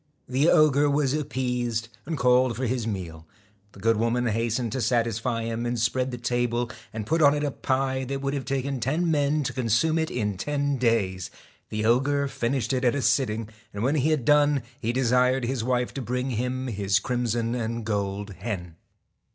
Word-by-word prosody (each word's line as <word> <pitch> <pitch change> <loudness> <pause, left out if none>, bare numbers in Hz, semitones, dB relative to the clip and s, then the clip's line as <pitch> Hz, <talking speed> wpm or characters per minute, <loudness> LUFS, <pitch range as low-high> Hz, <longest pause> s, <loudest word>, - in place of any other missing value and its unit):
The 135 +6 +2
ogre 145 -1 +5
was 140 -2 +1
appeased, 125 -6 -1 0.2
and 160 -2 -2
called 125 -1 +3
for 130 +4 -2
his 120 -2 -1
meal. 85 -6 -5 0.5
The - - -14
good 115 +2 +2
woman 115 +2 +1
hastened 115 +1 0
to 130 - -2
saflsfy 115 0 0
him) 115 0 -3
and 120 0 -1
spread 125 +3 +1
the 125 - -5
table 120 0 -1 0.2
aird 110 -2 -5
put 160 +7 +1
on 145 -1 +6
it 145 - -1
a 145 - 0
pie 130 0 -1
that 135 +2 -3
would 140 0 -2
have 140 -2 -3
taken 135 0 -2
ten 155 +8 0
men 150 0 +1
to - - -3
consume 130 +7 +1
it 160 - -1
in 105 -5 -2
ten 145 +4 -1
days. 100 -7 +1 0.4
The 110 0 -2
ogre 140 +5 +2
finished 125 -2 -1
it 130 0 0
at 125 +1 +3
a 140 - -1
sitting, 115 -2 +1 0.3
and 100 - -3
when 135 +4 +2
he 155 0 +2
had 150 -6 0
done 145 -2 +4 0.2
he 115 -2 -1
desired 125 +1 +2
his 125 -2 -2
wife 125 0 0
to 135 - -4
bring 125 +2 -2
him 125 +2 -2
his 100 -5 +1
crimson 120 0 -1
and 115 -1 -3
gold 100 -1 -2
hen. 90 -6 -5
125 Hz, 190 wpm, -26 LUFS, 115-135 Hz, 0.5 s, on